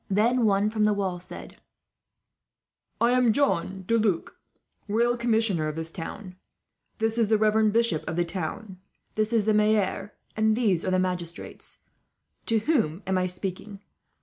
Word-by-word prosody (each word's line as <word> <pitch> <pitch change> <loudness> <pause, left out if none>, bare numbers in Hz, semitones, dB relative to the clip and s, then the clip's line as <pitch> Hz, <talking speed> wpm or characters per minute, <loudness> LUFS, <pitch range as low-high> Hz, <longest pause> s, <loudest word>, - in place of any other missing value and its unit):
Then 230 +5 +2
one 205 +1 +2
from 215 -1 0
the 210 - +3
wall 190 -3 -2
said: 180 +2 -10 1.4
"I 235 +1 +3
am 250 -2 +4
John 190 -8 0
De 230 +4 +2
Luc, 200 -6 0 0.5
royal 235 +3 +2
commissioner 225 -9 +1
of 155 - -4
this 160 0 -3
town. 185 +3 -8 0.6
This 225 +1 0
is 225 - +3
the 220 +1 +3
reverend 215 0 +3
bishop 230 -8 +1
of 160 - -3
the 175 0 +1
town. 185 +3 -5 0.3
This 215 +1 0
is 225 -3 +2
the 215 - +3
maire, 210 -1 +1 0.2
and 220 0 +2
these 200 -9 +2
the 185 0 +1
magistrates. 180 -2 -4 0.7
To 225 - +3
whom 210 - 0
am 190 -1 +1
I 185 - 0
speaking?" 190 +2 -6
210 Hz, 155 wpm, -26 LUFS, 185-225 Hz, 1.4 s, am